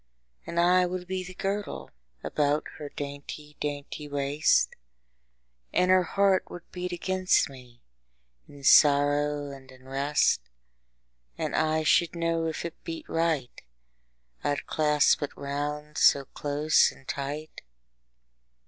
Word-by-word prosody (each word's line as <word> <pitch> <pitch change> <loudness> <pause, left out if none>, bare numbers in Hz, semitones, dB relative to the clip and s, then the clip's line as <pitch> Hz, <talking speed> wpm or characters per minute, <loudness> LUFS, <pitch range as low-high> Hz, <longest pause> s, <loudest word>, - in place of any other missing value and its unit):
And 170 - -2
I 180 +1 +4
would 180 0 -4
be 185 0 -3
the 185 0 -10
girdle 195 - -4 0.3
About 150 0 +1 0.2
her 150 -1 -6
dainty 145 +1 -8
dainty 145 +1 -5
waist, 145 +2 +2 1.0
And 180 0 +3
her 185 0 +6
heart 195 +1 +1
would 175 - -9
beat 180 0 -4
against 185 -3 +1
me, 125 -2 -15 0.6
In 140 -1 -14
sorrow 145 0 +4
and 135 -1 -12
in 130 0 -17
rest: 140 +2 +1 1.0
10 - - -3
And - - 0
I 155 0 +1
should 170 +2 +3
know 165 -1 0
if 160 +1 -4
it 170 - -8
beat 165 -1 -6
right, 165 -6 -1 0.8
I'd 145 0 -1
clasp 150 -1 +3
it 145 - -5
round 145 +2 -4
so 140 -1 +5
close 145 +3 +2
and 135 - -19
tight. 145 +3 -5
150 Hz, 130 wpm, -27 LUFS, 145-170 Hz, 1.0 s, her